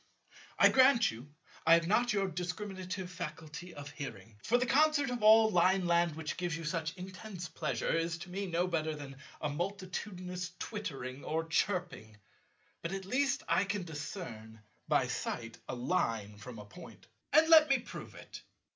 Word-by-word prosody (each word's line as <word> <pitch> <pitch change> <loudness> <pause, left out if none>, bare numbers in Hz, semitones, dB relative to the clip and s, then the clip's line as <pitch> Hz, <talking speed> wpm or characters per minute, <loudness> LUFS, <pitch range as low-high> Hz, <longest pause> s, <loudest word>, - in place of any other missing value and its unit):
I - - +7
grant 260 -2 +5
you 120 +6 -11 0.3
I 165 - +7
have 170 0 +2
not 240 +6 +3
your 200 -2 +1
discriminative 185 +1 -4
faculty 165 0 -7
of 145 0 -8
hearing; 110 -8 -8
for 240 - +3
the 250 - +1
concert 290 0 +3
of 245 -2 -3
all 220 +1 +7
Lineland 175 -3 +3
which 160 -1 -4
gives 175 -3 -2
you 165 - -7
such 160 +3 -2
intense 185 0 -7
pleasure, 155 -2 -2
is 165 0 0
to 175 +2 -9
me 195 +2 -3
no 175 0 +1
better 160 -3 -1
than 140 -2 -9 0.2
a 150 - 0
multitudinous 180 +1 -4
twittering 135 - -5
or 160 +1 -1
chirping. 170 - -1 0.6
But 165 +3 -4
at 195 -1 -4
least 270 +5 +1
I - - +3
can 200 -1 -2
discern, 125 - -7 0.2
by - - +3
sight, 115 -1 -4
a - - -2
Line 115 - -1
from 115 +3 -9
a 105 - -9
Point. 170 +11 -13 0.3
And 315 +1 +6
let 315 -2 +8
me 270 - +5
prove 240 - -9
it. - - -10
175 Hz, 165 wpm, -33 LUFS, 150-200 Hz, 0.6 s, let